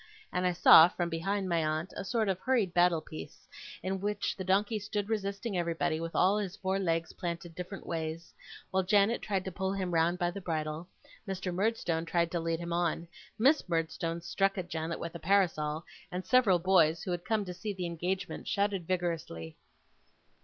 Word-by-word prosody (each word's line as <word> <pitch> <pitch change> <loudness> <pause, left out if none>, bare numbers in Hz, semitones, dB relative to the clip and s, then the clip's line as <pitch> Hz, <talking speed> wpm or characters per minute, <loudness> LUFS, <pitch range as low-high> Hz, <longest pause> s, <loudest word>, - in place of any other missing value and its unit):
and 180 0 +1
I - - +2
saw, 165 -1 +9
from 175 -1 -2
behind 190 +4 -1
my 170 -2 +1
aunt, 155 +3 -2
a - - -4
sort 220 +1 0
of 190 -2 0
hurried 225 -6 +1
battle 175 -2 +4
piece, 80 - -10 0.4
in 190 +1 -1
which 205 0 -1
the 190 - -5
donkey 205 +4 +1
stood 205 0 -3
resisting 200 0 -2
everybody, 170 -2 0
with 165 0 -5
all 195 +3 +4
his 195 -4 -4
four 190 0 -1
legs 165 -3 -1
planted 170 -2 -5
different 180 +3 -7
ways, 165 0 -4 0.4
while 190 - +2
Janet 200 +4 +3
tried 195 -3 -1
to 190 - -3
pull 190 +2 -2
him 185 -3 -2
round 165 +2 +3
by 175 -1 0
the 200 - -7
bridle, 155 -1 -3 0.4
Mr. 190 -1 -3
Murdstone 175 -4 0
tried 170 -1 +1
to 175 - 0
lead 165 0 -1
him 170 0 -4
on, 170 -1 0 0.3
Miss 270 - +3
Murdstone 165 0 -1
struck 195 +3 0
at 180 -1 -4
Janet 160 +1 -3
with 170 - -5
a 170 - -7
parasol, 160 -4 +1 0.3
and 180 +1 -4
several 240 -8 +5
boys, 170 -3 +3
who 185 - -3
had 175 0 -2
come 215 -2 0
to 180 - -5
see 210 +4 -4
the 185 -3 -4
engagement, 175 +3 -3
shouted 200 -4 0
vigorously. 165 - -3
180 Hz, 190 wpm, -31 LUFS, 165-195 Hz, 0.4 s, saw